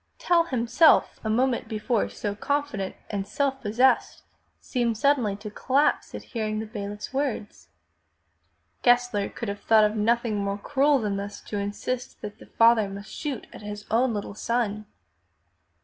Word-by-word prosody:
Tell 340 Hz, -1 st, +3 dB
himself, 255 Hz, +3 st, +3 dB
a 220 Hz, -, -2 dB
moment 245 Hz, +1 st, +1 dB
before 220 Hz, 0 st, -1 dB
so 205 Hz, -1 st, -4 dB
confident 285 Hz, -4 st, -2 dB, 0.2 s
and 200 Hz, -2 st, -3 dB
self 270 Hz, +4 st, -1 dB
possessed, 240 Hz, +5 st, +2 dB, 0.4 s
seemed 235 Hz, -3 st, -1 dB
suddenly 250 Hz, -6 st, +2 dB
to 210 Hz, +1 st, -8 dB
collapse 275 Hz, +7 st, +1 dB
at -, -, -7 dB
hearing 215 Hz, -2 st, -1 dB
the 220 Hz, -, -3 dB
bailiff's 210 Hz, 0 st, -6 dB
words. 265 Hz, -6 st, -3 dB, 1.1 s
Gessler 245 Hz, -4 st, +3 dB
could 235 Hz, -, -6 dB
have 200 Hz, 0 st, -4 dB
thought 220 Hz, -1 st, +5 dB
of 210 Hz, +1 st, +2 dB
nothing 230 Hz, 0 st, +1 dB
more 200 Hz, 0 st, -1 dB
cruel 285 Hz, +6 st, +2 dB
than 210 Hz, -5 st, -1 dB
thus 200 Hz, +1 st, -6 dB
to 205 Hz, -, -4 dB
insist 205 Hz, +5 st, -4 dB
that 210 Hz, +1 st, -8 dB
the -, -, -14 dB
father 230 Hz, -3 st, +4 dB
must 200 Hz, +1 st, -9 dB
shoot 285 Hz, -6 st, -4 dB
at -, -, -10 dB
his 210 Hz, 0 st, -7 dB
own 240 Hz, +3 st, +3 dB
little 205 Hz, 0 st, -4 dB
son. 215 Hz, -1 st, -2 dB
220 Hz, 155 wpm, -26 LUFS, 205-255 Hz, 1.1 s, thought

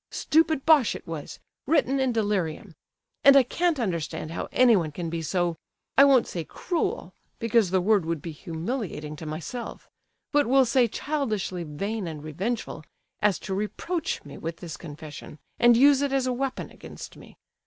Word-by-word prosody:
Stupid 315 Hz, -2 st, +1 dB
bosh 300 Hz, -8 st, +5 dB
it -, -, -9 dB
was—written 265 Hz, -, -2 dB
in 265 Hz, -1 st, +2 dB
delirium. 205 Hz, -5 st, -1 dB, 0.5 s
And 275 Hz, 0 st, +8 dB
I 270 Hz, -, +7 dB
can't 335 Hz, +4 st, 0 dB
understand 170 Hz, -7 st, -3 dB
how -, -, -4 dB
anyone 215 Hz, -11 st, +4 dB
can 165 Hz, +2 st, -5 dB
be 165 Hz, -1 st, -2 dB
so—I 175 Hz, -, 0 dB
won't 265 Hz, -4 st, +5 dB
say 170 Hz, -, -4 dB
cruel, 345 Hz, -, -3 dB, 0.2 s
because 230 Hz, -3 st, +2 dB
the 185 Hz, 0 st, +2 dB
word 195 Hz, -3 st, +2 dB
would 165 Hz, -1 st, -1 dB
be 165 Hz, -, -6 dB
humiliating 165 Hz, -, -5 dB
to 155 Hz, -, -8 dB
myself, 170 Hz, +11 st, -6 dB, 0.4 s
but 290 Hz, -1 st, +3 dB
we'll 265 Hz, +1 st, +5 dB
say 245 Hz, 0 st, +3 dB
childishly 215 Hz, -, -2 dB
vain 195 Hz, +6 st, -4 dB
and 155 Hz, -2 st, -7 dB
revengeful, 185 Hz, +2 st, -4 dB, 0.4 s
as 210 Hz, -3 st, +3 dB
to 195 Hz, -, -4 dB
reproach 260 Hz, -, -3 dB
me 145 Hz, -1 st, -10 dB
with 165 Hz, +1 st, -5 dB
this 170 Hz, -3 st, -7 dB
confession, 150 Hz, -1 st, -10 dB, 0.2 s
and 240 Hz, -1 st, +6 dB
use 280 Hz, +2 st, +6 dB
it 285 Hz, -1 st, 0 dB
as 270 Hz, -1 st, +1 dB
a 255 Hz, -, 0 dB
weapon 265 Hz, +1 st, -3 dB
against -, -, -10 dB
me. -, -, -15 dB
210 Hz, 165 wpm, -26 LUFS, 165-265 Hz, 0.5 s, And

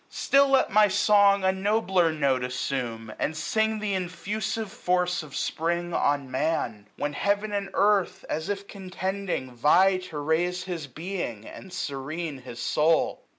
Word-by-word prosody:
Still 275 Hz, 0 st, +3 dB
l^t 270 Hz, -1 st, +4 dB
my 210 Hz, +1 st, +6 dB
song 200 Hz, 0 st, +4 dB
a 190 Hz, -, +4 dB
nobler 190 Hz, -3 st, +1 dB
note 140 Hz, -5 st, +1 dB
assume. 125 Hz, -3 st, -3 dB
And 155 Hz, +1 st, -1 dB
sing 220 Hz, +6 st, 0 dB
th* 210 Hz, -1 st, -2 dB
infusive 195 Hz, +4 st, -3 dB
force 180 Hz, -5 st, 0 dB
of 150 Hz, -3 st, -10 dB
Spring 170 Hz, +2 st, -1 dB
on 140 Hz, -4 st, 0 dB
Man; 125 Hz, -7 st, -1 dB
865 -, -, -13 dB
When 145 Hz, 0 st, -1 dB
heaven 205 Hz, +5 st, 0 dB
and 200 Hz, -1 st, -2 dB
earth, 200 Hz, -2 st, +2 dB
as 160 Hz, +3 st, -3 dB
if 200 Hz, 0 st, -3 dB
contending, 190 Hz, -6 st, -4 dB
vie 180 Hz, +10 st, +4 dB
To 185 Hz, -4 st, -8 dB
raise 170 Hz, +5 st, 0 dB
his 170 Hz, -6 st, -5 dB
being, 150 Hz, -, -5 dB
and 190 Hz, -, -11 dB
serene 155 Hz, -1 st, -4 dB
his 125 Hz, -2 st, -10 dB
soul. 155 Hz, +6 st, +1 dB
180 Hz, 150 wpm, -26 LUFS, 145-200 Hz, -, my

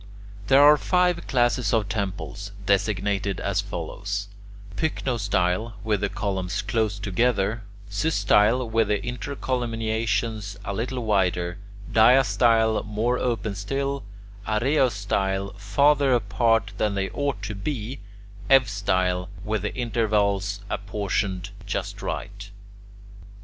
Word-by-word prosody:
There 135 Hz, +4 st, +6 dB
are 150 Hz, +1 st, +8 dB
five 180 Hz, +1 st, +1 dB
classes 120 Hz, -3 st, +2 dB
of 110 Hz, -3 st, +1 dB
temples, 100 Hz, -1 st, -4 dB
designated 100 Hz, 0 st, 0 dB
as 100 Hz, 0 st, 0 dB
follows: 100 Hz, +1 st, -4 dB, 0.5 s
pycnostyle, 110 Hz, -, 0 dB
with 105 Hz, -3 st, 0 dB
the 100 Hz, -, 0 dB
columns 95 Hz, -1 st, -2 dB
close 110 Hz, -3 st, 0 dB
together; 105 Hz, +1 st, 0 dB, 0.3 s
systyle, 105 Hz, +1 st, +2 dB
with 110 Hz, -1 st, +1 dB
the 105 Hz, 0 st, +2 dB
intercolumniations 115 Hz, -4 st, -2 dB
a 100 Hz, -, -3 dB
little 120 Hz, +3 st, -3 dB
wider; 90 Hz, -3 st, +1 dB, 0.3 s
diastyle, 110 Hz, -1 st, +4 dB
more 110 Hz, +4 st, -1 dB
open 115 Hz, -4 st, -1 dB
still; 135 Hz, +7 st, -2 dB, 0.4 s
araeostyle, 105 Hz, -5 st, 0 dB
farther 140 Hz, +6 st, +3 dB
apart 115 Hz, +1 st, +1 dB
than 105 Hz, -2 st, +1 dB
they 95 Hz, 0 st, -2 dB
ought 140 Hz, -8 st, -2 dB
to 100 Hz, +1 st, -3 dB
be; 115 Hz, +4 st, -4 dB, 0.5 s
eustyle, 95 Hz, -8 st, +2 dB, 0.2 s
with 105 Hz, -1 st, -1 dB
the 105 Hz, -, -4 dB
intervals 105 Hz, -4 st, 0 dB
apportioned 100 Hz, -2 st, -2 dB, 0.2 s
just -, -, -3 dB
right. 100 Hz, 0 st, -5 dB
105 Hz, 105 wpm, -25 LUFS, 100-120 Hz, 0.5 s, are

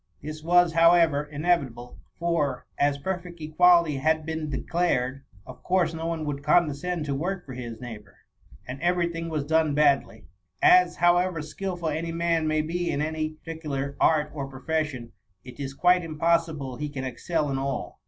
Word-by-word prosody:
This 155 Hz, +1 st, -7 dB
was, 175 Hz, +1 st, +4 dB
however, 165 Hz, -3 st, +5 dB
inevitable, 145 Hz, -6 st, -2 dB, 0.2 s
for^ 165 Hz, -6 st, 0 dB, 0.2 s
as 145 Hz, 0 st, +2 dB
perfect 175 Hz, +1 st, -5 dB
equality 165 Hz, 0 st, +4 dB
had 155 Hz, +3 st, +1 dB
been 160 Hz, -1 st, -3 dB
declared, 135 Hz, -3 st, -1 dB, 0.2 s
of -, -, -12 dB
course 180 Hz, -2 st, +1 dB
no 165 Hz, 0 st, -4 dB
one 165 Hz, -2 st, -3 dB
would 145 Hz, -1 st, -3 dB
condescend 155 Hz, +2 st, +1 dB
to 140 Hz, -, -2 dB
work 175 Hz, +6 st, -3 dB
for 130 Hz, -, -8 dB
his 120 Hz, -3 st, -7 dB
neighbour; 105 Hz, -5 st, -10 dB, 0.5 s
and 130 Hz, +3 st, -7 dB
every 175 Hz, 0 st, +1 dB
thing 165 Hz, 0 st, -5 dB
was 155 Hz, -3 st, -2 dB
done 155 Hz, 0 st, +1 dB
badly; 145 Hz, -2 st, +2 dB, 0.3 s
as, 365 Hz, 0 st, +5 dB
however 175 Hz, -1 st, +2 dB
skilful 175 Hz, +1 st, -4 dB
any 160 Hz, +2 st, -3 dB
man 165 Hz, -1 st, 0 dB
may 155 Hz, 0 st, +1 dB
be 175 Hz, +2 st, -2 dB
in -, -, -1 dB
any 155 Hz, 0 st, -2 dB
par 165 Hz, -, -4 dB
ticular 140 Hz, -3 st, -4 dB
art 150 Hz, -1 st, +3 dB
or 140 Hz, -3 st, -4 dB
profession, 135 Hz, -2 st, -3 dB, 0.3 s
it 125 Hz, 0 st, -12 dB
is 135 Hz, -1 st, -5 dB
quite 180 Hz, +3 st, +4 dB
impossible 160 Hz, -4 st, 0 dB
he 150 Hz, 0 st, -4 dB
can 140 Hz, -2 st, -5 dB
excel 150 Hz, +3 st, -2 dB
in 135 Hz, -, -1 dB
all. 135 Hz, -1 st, -4 dB
155 Hz, 170 wpm, -26 LUFS, 140-170 Hz, 0.5 s, however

